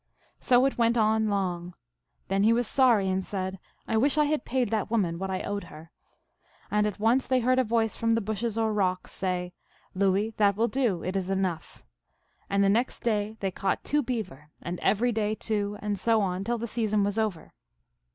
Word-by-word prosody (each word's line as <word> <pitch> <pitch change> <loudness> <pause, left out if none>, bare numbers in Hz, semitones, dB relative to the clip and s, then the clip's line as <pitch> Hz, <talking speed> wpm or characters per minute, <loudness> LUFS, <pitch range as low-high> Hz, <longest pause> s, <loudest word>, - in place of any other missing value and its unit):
So 250 +1 +4
it 275 - -1
went 235 0 +3
on 220 0 +2
long. 180 -3 -2 0.5
Then 195 +1 +1
he 220 +3 +5
was 240 +1 +1
sorry, 235 -7 +4
and 190 0 0
said, 190 -1 -4 0.3
4 - - -4
1 - - +3
wish 285 +3 +3
I 300 - +4
had 300 -3 -1
paid 250 -3 0
that 220 -2 -1
woman 185 -7 0
what 190 0 -3
I 190 -1 -2
owed 200 -2 -3
her. 160 0 -13 0.8
And 210 0 +2
at 210 -1 -5
once 235 +5 +2
they 260 -1 +2
heard 255 +2 +3
a - - +4
voice 225 -1 0
from 230 0 +1
the - - +2
bushes, 220 +2 -3
or 220 -1 +1
rocks, 185 -3 -1
say, 180 -1 -2 0.4
Louis, 195 +3 +1
that 200 -2 +3
will 225 +3 +2
do. 235 -10 0
It 185 +2 -3
is 190 -1 -2
enough. 185 -4 -3 0.7
And 200 0 +2
the - - +4
next 230 +6 +1
day 215 -1 -1
they 195 -1 -1
caught 195 +2 -2
two 295 0 +1
beaver, 205 - -5
and 175 +1 -5
every 240 +4 +2
day 215 -1 -1
two, 210 -2 -2
and 205 -2 -2
so 225 -1 +3
on, 185 -1 -1
till 240 0 0
the 235 - -4
season 215 -3 0
was 205 +2 -1
over. 205 -8 -3
210 Hz, 210 wpm, -27 LUFS, 190-230 Hz, 0.8 s, he